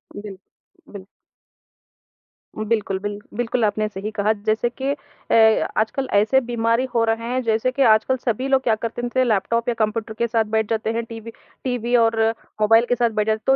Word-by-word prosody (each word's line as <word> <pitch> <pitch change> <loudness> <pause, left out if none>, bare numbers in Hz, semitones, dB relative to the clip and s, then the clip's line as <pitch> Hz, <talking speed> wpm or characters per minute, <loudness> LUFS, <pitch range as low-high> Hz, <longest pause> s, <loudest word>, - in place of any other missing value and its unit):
बिल्क 205 -2 -8 0.5
बिल्क 195 -1 -9 1.5
बिल्कुल 215 -3 -1
बिल्क 205 0 -5
बिल्कुल 240 -1 0
आपने 215 +1 0
सही 205 +2 -6
कहा 210 0 +1
जैसे 220 +2 +1
कि 265 +3 -4
अ, 225 -5 +2
आजकल 220 +5 0
ऐसे 215 +6 +4
बीमारी 235 0 0
हो 230 -1 +2
रहे 225 +1 -1
हैं 255 - 0
जैसे 225 +3 +1
कि 275 - -3
आजकल 225 +3 +4
सभी 250 +2 -2
लोग 270 -1 +3
क्या 225 -3 +2
करते 230 +2 -5
थे 255 - +4
लैपटॉप 230 +1 0
या - - +1
कंप्यूटर 220 +1 -1
के 235 - +1
साथ 225 -1 +1
बैठ 220 -1 +1
जाते 220 -1 -1
हैं। 230 0 -2
टीवी 230 0 -9 0.3
टीवी 245 -1 -1
और 225 -1 +3 0.4
मोबाइल 225 +2 +5
के 245 - +3
साथ 240 -1 +2
बैठ 215 -1 -1
जाते - - +3 0.2
हैं। 270 - +5
225 Hz, 185 wpm, -21 LUFS, 215-240 Hz, 1.5 s, मोबाइल